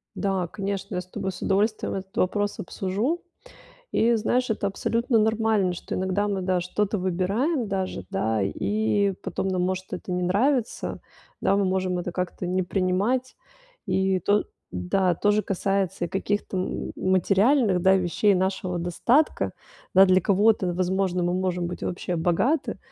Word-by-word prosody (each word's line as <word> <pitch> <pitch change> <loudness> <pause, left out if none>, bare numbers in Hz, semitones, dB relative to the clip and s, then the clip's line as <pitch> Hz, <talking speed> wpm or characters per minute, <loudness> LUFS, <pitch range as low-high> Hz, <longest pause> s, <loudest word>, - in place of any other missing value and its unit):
Да, 190 -3 -1
конечно, 195 +1 -4
я 180 - -1
с - - -13
тобой 190 +1 -4
с 180 - -11
удовольствием 210 +3 +1
этот 190 0 -6
вопрос 205 +2 0
обсужу. 205 - -2 0.7
И 235 +1 +3
знаешь, 245 +2 0
это 210 -2 0
абсолютно 230 +4 0
нормально, 220 -3 +2
что 175 - -6
иногда 190 +2 0
мы, 195 -2 -1
да, 180 -1 +1
что-то 200 +3 -1
выбираем 200 - 0
даже, 190 -2 -3
да 110 - 0
и 205 - +1
потом 190 +1 -2
нам 185 -1 0
может 185 +1 -1
это 180 0 -5
не 180 0 -1
нравиться, 235 +7 0 0.4
да, 195 +1 +2
мы 200 - +2
можем 185 -1 0
это 175 0 -4
как-то 180 0 -3
не 185 +1 0
принимать. 195 +8 0 0.5
И 190 0 +1
то 205 +4 +2 0.3
да 170 - +1
то 205 +5 +2
же 210 0 +2
касается 195 -2 -1
и - - -3
каких-то 195 +1 -2
м 185 - -3
материальных, 195 +3 +3
да, 190 +1 +5
вещей 190 +2 +2
нашего 185 -1 -1
достатка. 230 - +1 0.4
Да, 190 +1 +9
для 185 0 +4
кого-то, 200 -1 +3
возможно, 185 0 0
мы 175 0 +1
можем 180 -2 -1
быть 175 - -6
вообще 175 0 -3
богаты, 210 - +1
190 Hz, 155 wpm, -25 LUFS, 180-210 Hz, 0.7 s, Да